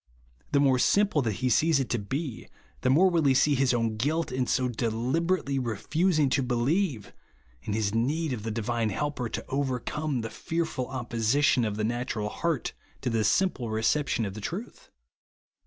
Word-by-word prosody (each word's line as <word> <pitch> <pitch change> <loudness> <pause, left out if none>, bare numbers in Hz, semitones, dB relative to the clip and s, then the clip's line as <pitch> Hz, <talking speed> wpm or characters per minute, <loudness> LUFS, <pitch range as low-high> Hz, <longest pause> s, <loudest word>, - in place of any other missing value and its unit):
The 140 - +3
more 135 -2 +4
sim 205 +10 +4
jple 150 -7 +1
that 110 - +1
he - - +3
sees 155 +4 +3
it 135 - -1
to 120 - +1
be, 130 +4 -4 0.3
the - - +1
more 165 +9 +5
will 170 -3 +2
he 135 -1 +4
see 145 +3 +4
his 135 -1 +2
own 115 -3 0
guilt, 155 +6 0
in 130 -1 -1
so 130 -1 +1
deliberately 130 +7 0
refusing 150 - +1
to 140 - +2
believe, 125 - 0 0.5
and 105 - -2
his 105 -2 0
need 140 +6 0
of 115 - -4
the 110 - -4
divine 115 +1 -1
Helper 135 +1 -2
to - - -5
overcome 135 +1 -2
the 115 - -5
fearful 160 -6 -3
opposition 125 +1 +1
of 105 -2 -2
the 110 - -1
natural 115 -2 -2
heart 165 +2 -2 0.3
to 125 - -1
the 115 -1 +1
simple 125 - +1
recep 110 +7 +1
tion 115 - 0
of 100 - -4
the 110 - -8
truth. 185 - -6
130 Hz, 185 wpm, -27 LUFS, 115-150 Hz, 0.5 s, more